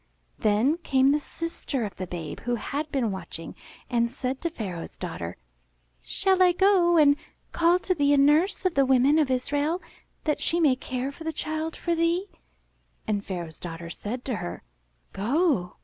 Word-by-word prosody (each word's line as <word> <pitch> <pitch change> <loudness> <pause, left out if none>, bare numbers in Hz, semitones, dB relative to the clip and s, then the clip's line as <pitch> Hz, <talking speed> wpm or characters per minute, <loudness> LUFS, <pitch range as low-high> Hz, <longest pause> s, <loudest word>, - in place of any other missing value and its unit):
Then 220 +9 +3
came 270 -4 +3
the 295 - +2
sister 295 -5 -4
of 205 - -7
the 185 - -4
babe, 165 -4 -6
who 245 0 -1
had 290 +6 -4
been 245 -6 0
watching, 190 -3 -6 0.3
and 235 -1 +1
said 255 +2 -4
to 335 - 0
Pharaoh's 190 - -6
daughter, 90 - -5 0.7
''Shall 380 -1 +1
I 360 -1 +6
go 360 -2 +4
and 285 -2 +6 0.4
call 340 +1 +4
to 370 0 0
thee 285 -4 +2
a 290 - +5
nurse 310 +9 +3
of 370 - +2
the 275 - +4
women 270 +4 +5
of 295 -4 +2
Israel 290 +6 0 0.4
that 300 -2 0
she 340 - +1
may 295 -6 +4
care 255 +1 -4
for 320 - -11
the 320 - -2
child 315 +1 -3
for 340 - -1
thee?" 335 +3 +1 0.8
And 205 -2 -1
Pharaoh's 170 -5 -6
daughter 170 -1 -7
said 240 +7 -5
to 250 -5 -1
her, 85 - -6 0.5
''Go." 235 - +1
275 Hz, 175 wpm, -26 LUFS, 215-330 Hz, 0.8 s, I